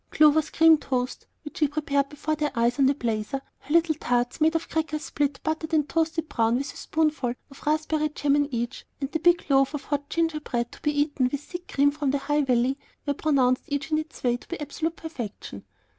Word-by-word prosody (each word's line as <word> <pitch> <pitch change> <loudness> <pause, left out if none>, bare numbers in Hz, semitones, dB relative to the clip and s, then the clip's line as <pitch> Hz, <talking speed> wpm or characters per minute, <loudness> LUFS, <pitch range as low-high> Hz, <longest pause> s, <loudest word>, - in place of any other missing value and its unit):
Clover's 305 0 +4
cream 325 -1 +6
toast, 255 -3 -3 0.2
which 295 - -8
she 300 - +4
prepared 285 -1 0
before 300 +1 -3
their 300 -1 0
eyes 235 +2 +1
on 270 - +5
the 275 - +3
blazer, 230 +1 -2 0.2
her 285 - -12
little 335 0 +4
tarts 245 -2 -1
made 320 +1 +4
of 330 - -1
crackers 310 -1 -2
split, 285 -2 -1
buttered, 315 +1 -1
and 300 -2 +2
toasted 325 +1 0
brown 230 -4 +1
with 275 +3 -2
a - - -20
spoonful 300 -6 0 0.2
of 275 - -14
raspberry 310 0 +1
jam 290 -1 +1
in 290 0 +1
each, 235 -1 -3 0.2
and 275 0 -3
the 320 - -1
big 345 +2 +4
loaf 275 +1 +3
of 280 - -5
hot 285 0 -3
ginger 325 -2 0
bread 240 -5 -3
to - - -14
be 295 -1 +1
eaten 285 -4 +1
with 285 - -3
thick 350 +3 -8
cream 285 +1 +3
from 290 -1 -2
the 280 - +2
High 295 +2 +1
Valley, 260 0 +1 0.3
were 285 - +1
pronounced 265 -4 +2
each 295 +2 -3
in 310 - +3
its 315 +1 -8
way 245 -1 +2
to - - -18
be 345 - -5
absolute 320 +2 -3
perfection. 260 - -7
290 Hz, 220 wpm, -26 LUFS, 270-310 Hz, 0.3 s, cream